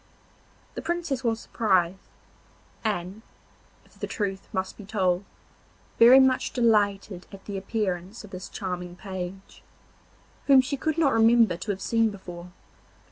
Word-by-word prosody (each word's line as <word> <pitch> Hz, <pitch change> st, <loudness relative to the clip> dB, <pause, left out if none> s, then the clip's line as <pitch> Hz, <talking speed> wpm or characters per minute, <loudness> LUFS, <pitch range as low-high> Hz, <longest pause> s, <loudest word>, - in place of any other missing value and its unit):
The -, -, -5 dB
Princess 335 Hz, -7 st, -2 dB
was 225 Hz, -2 st, 0 dB
surprised, 190 Hz, -5 st, 0 dB, 0.7 s
and, 200 Hz, -1 st, -3 dB, 0.6 s
if -, -, -24 dB
the -, -, -3 dB
truth 195 Hz, -2 st, -3 dB
must 190 Hz, 0 st, -3 dB
be 210 Hz, -, -11 dB
told, 190 Hz, -2 st, 0 dB, 0.7 s
very 240 Hz, +3 st, +9 dB
much 265 Hz, -1 st, +2 dB
delighted 205 Hz, -5 st, +1 dB
at 195 Hz, -1 st, -12 dB
the 200 Hz, -, -5 dB
appearance 195 Hz, 0 st, -3 dB
of 205 Hz, -, -13 dB
this 185 Hz, +1 st, -7 dB
charming 180 Hz, -2 st, -5 dB
page, 190 Hz, 0 st, -7 dB, 0.9 s
whom 275 Hz, -2 st, +8 dB
she 260 Hz, +2 st, 0 dB
could 315 Hz, +3 st, -2 dB
not 295 Hz, -5 st, +3 dB
remember 225 Hz, -3 st, +5 dB
to 170 Hz, +5 st, -8 dB
have 195 Hz, -1 st, -2 dB
seen 225 Hz, +1 st, +2 dB
before. 180 Hz, -3 st, -9 dB
200 Hz, 135 wpm, -26 LUFS, 185-230 Hz, 0.9 s, very